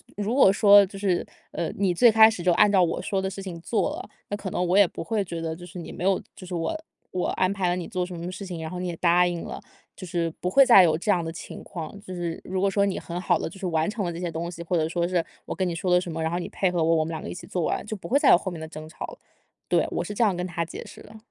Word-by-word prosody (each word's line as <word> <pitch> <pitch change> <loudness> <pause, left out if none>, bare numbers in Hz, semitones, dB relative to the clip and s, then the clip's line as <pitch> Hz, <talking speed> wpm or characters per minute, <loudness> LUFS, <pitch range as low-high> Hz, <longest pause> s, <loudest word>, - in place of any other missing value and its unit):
就 205 - -3
如 220 +4 -1
果 265 -8 +6
说 200 0 +7
就 195 +1 -10
是， 195 -3 0 0.2
呃， 170 - -2
你 190 -3 +2
最 235 +7 +6
开 220 0 +7
始 205 - -5
就 175 0 +3
按 210 +2 +5
照 190 -2 +5
我 170 - 0
说 195 -1 -1
的 190 - -2
事 195 0 -7
情 175 -3 -6
做 210 +6 0
了， - - -8 0.2
那 205 - -2
可 195 -2 -5
能 180 - 0
我 180 +3 +2
也 200 -3 +7
不 - - -7
会 210 +1 -1
觉 170 -2 -5
得 160 -1 -3
就 175 +2 -10
是 180 +1 -11
你 170 - -7
没 180 - -5
有 195 -1 +2 0.2
就 185 - -10
是 180 - -4
我 165 - -1 0.4
我 180 - -1
安 185 +1 +1
排 195 -2 -1
了 175 - +1
你 180 -2 -5
做 180 -1 -2
什 180 - -8
么 170 +2 -5
事 195 +1 -7
情， 175 -3 -6
然 160 - -5
后 180 +1 -6
你 180 - -3
也 170 - -3
答 175 +1 +4
应 175 -1 -2
了， - - -6 0.4
就 185 - -8
是 170 -2 -1
不 180 - -1
会 275 - +7
再 195 -7 +8
有 160 -2 +3
这 205 +6 -5
样 180 -4 +3
的 165 - -4
情 165 - -9
况。 175 +3 -7
就 185 - -9
是 170 -2 -4
如 185 0 -3
果 200 - +3
说 200 +1 +2
你 195 - -1
很 175 +1 -6
好 180 - +1
地 - - -3
就 195 - -13
是 190 - -5
完 165 0 +1
成 210 -3 -3
了 175 - -2
这 165 - -6
些 175 -1 -2
东 165 +2 -4
西， 170 - -9
或 170 +1 -2
者 155 0 +1
说 175 0 0
是 175 -2 0 0.2
我 - - -5
跟 185 -1 0
你 170 - -2
说 180 +2 -3
了 180 - +6
什 175 - -6
么， 160 0 -4
然 160 +1 -1
后 175 - -1
你 175 - -4
配 190 - 0
合 175 -2 0
我， 165 +1 +3
我 160 - +2
们 - - -5
两 160 +1 -4
个 - - -6
一 - - -5
起 175 - -10
做 180 - -2
完 - - -1
就 215 - -3
不 - - -9
会 280 - +3
再 - - +4
有 - - +8
后 190 - -5
面 165 - -7
的 160 - -6
争 155 0 -9
吵 - - -8
了。 - - -11 0.5
“对， - - +2
我 - - -1
是 210 - -6
这 230 - +1
样 200 -4 +2
跟 180 - -2
他 170 -2 -2
解 - - -8
释 - - -12
的。 220 +1 -13
180 Hz, 365 characters per minute, -25 LUFS, 170-195 Hz, 0.5 s, 再